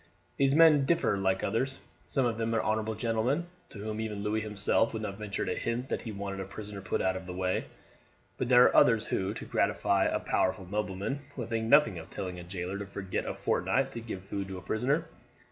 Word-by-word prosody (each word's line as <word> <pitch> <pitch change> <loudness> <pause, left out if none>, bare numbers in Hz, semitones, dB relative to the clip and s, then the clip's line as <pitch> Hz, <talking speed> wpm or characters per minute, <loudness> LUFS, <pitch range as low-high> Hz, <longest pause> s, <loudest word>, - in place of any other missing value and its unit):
These 135 0 +3
men 155 -4 +7
differ 170 -7 +2
like 95 -1 0
others. 125 +6 0 0.3
Some 135 -3 +1
of 115 -2 -1
them 115 0 0
are 110 - +1
honourable 110 0 0
gentlemen, 115 +8 0 0.2
to - - -11
whom 110 +1 -4
even 105 -2 -4
Louis 105 +1 0
himself 105 +1 +1
would 110 -1 -3
not 100 -1 -5
venture 105 -2 -3
to - - -1
hint 120 +3 -2
that - - -1
he 115 - -6
wanted 100 -1 -5
a 95 - -3
prisoner 100 0 -8
put 95 - -1
out 95 0 +1
of 95 -1 -6
the 90 - -6
way; 90 0 0 0.7
but 125 - -1
there 125 -1 +8
are - - +4
others 115 -2 +5
who, 95 +1 -1
to - - -6
gratify 100 -1 +2
a - - +1
powerful 95 0 0
nobleman, 105 +6 -2 0.2
would 120 -4 -5
think 115 -1 -1
nothing 115 - +5
of 80 - -11
telling 90 -2 -5
a - - -8
jailer 90 +2 -4
to 100 - -4
forget 95 -1 -4
a - - -3
fortnight - - +1
to 115 - -5
give 105 -5 -6
food 100 0 -4
to 95 -1 -6
a - - -8
prisoner. 140 +9 0
105 Hz, 225 wpm, -30 LUFS, 95-115 Hz, 0.7 s, there